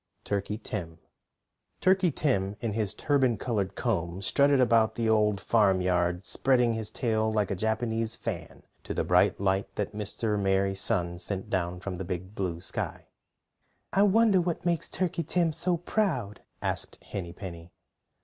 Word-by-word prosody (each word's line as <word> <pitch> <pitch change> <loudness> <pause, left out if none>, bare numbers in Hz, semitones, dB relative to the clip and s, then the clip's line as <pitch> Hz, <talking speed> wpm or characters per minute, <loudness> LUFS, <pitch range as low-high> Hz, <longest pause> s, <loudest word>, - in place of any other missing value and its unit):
TURKEY 100 +1 -2
TIM 85 -7 -5 0.8
TURKEY 185 -1 +4
TIM 105 -10 0
in 115 -3 -2
his 105 -3 -1
turban 135 -5 +2
colored 105 -6 -2
comb 95 -6 -2
strutted 140 +6 +4
about 115 -3 +4
the 115 -1 0
Old 105 -2 +3
Farmyard, 90 -4 +2
spreading 125 -3 +2
his 110 -1 -3
tail 110 -3 0
like 105 -2 0
a - - 0
Japanese 110 +2 -1
fan - - -6 0.2
to - - -5
the - - +1
bright - - +3
light 95 0 0
that 105 0 -2
Mr. 105 0 -1
Merry 95 0 +2
Sun 90 -2 0
sent 95 +1 -2
down 90 -1 -1
from 90 -1 -5
the - - -2
Big 90 +2 -5
Blue 90 -5 -3
Sky. - - -5 0.8
"I 195 - +4
wonder 205 -1 +5
what 170 -1 -3
makes 170 -2 0
Turkey 180 -2 -1
Tim 165 0 +1
so 175 +2 0
proud?" 160 - -1 0.2
asked - - -3
Henny 90 -4 -5
Penny. 85 -2 -9
105 Hz, 155 wpm, -28 LUFS, 95-130 Hz, 0.8 s, wonder